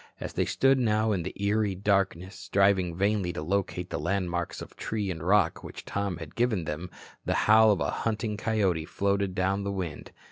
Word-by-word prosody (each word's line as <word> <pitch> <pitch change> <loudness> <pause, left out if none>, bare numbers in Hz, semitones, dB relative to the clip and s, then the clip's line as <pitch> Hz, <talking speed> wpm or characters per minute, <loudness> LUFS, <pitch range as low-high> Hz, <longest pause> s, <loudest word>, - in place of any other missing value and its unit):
As - - -6
they - - +1
stood 135 0 +3
now 110 -2 +2
in 95 -4 0
the 90 - -4
eerie 100 0 +1
darkness, 95 -2 0
striving 95 -2 +2
vainly 100 -1 +1
to 75 - -5
locate 90 0 -2
the - - -2
landmarks 90 -3 -2
of - - -10
tree 105 -3 -3
and 80 -3 -6
rock 100 +5 +2
which - - -9
Tom 100 -3 -2
had 80 -2 -9
given 115 -7 +1
them, 80 +3 -5 0.3
the - - 0
howl 110 +1 +7
of 95 -5 0
a - - 0
hunting 110 -1 -1
coyote 100 -7 0
floated 100 +1 -1
down 95 +1 0
the 100 - -2
wind. 90 -6 -5
100 Hz, 190 wpm, -28 LUFS, 90-105 Hz, 0.3 s, howl